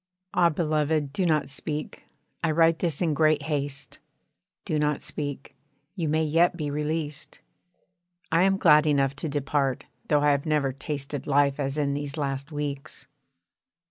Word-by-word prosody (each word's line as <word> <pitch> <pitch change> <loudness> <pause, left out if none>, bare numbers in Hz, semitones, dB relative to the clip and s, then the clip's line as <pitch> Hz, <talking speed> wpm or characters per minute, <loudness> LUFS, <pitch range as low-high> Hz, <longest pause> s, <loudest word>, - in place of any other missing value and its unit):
Ah 175 -1 +4
beloved, 155 -2 0
do 180 +4 +1
not 155 -2 +2
speak. 150 +2 -5 0.4
I 165 - +2
write 165 +1 +3
this 170 -1 0
in 160 -3 +1
great 155 0 +3
haste 140 -3 -3 0.7
do 155 - 0
not 150 -1 +1
speak, 145 -2 -5 0.4
you 165 -6 -1
may 160 +1 +2
yet 165 +3 +3
be 150 -3 -3
released. 150 0 -3 0.9
I 165 +1 +4
am 195 +1 +3
glad 150 -3 +5
enough 140 -2 +2
to 155 - -3
depart 140 -2 -1 0.2
though 150 -1 +3
I 145 0 +4
have 140 +1 0
never 150 -3 +1
tasted 140 0 -5
life 140 0 +3
as 135 +1 -2
in 140 -2 +1
these 145 +1 -4
last 140 0 -3
weeks. 145 -2 -5
150 Hz, 155 wpm, -26 LUFS, 140-155 Hz, 0.9 s, glad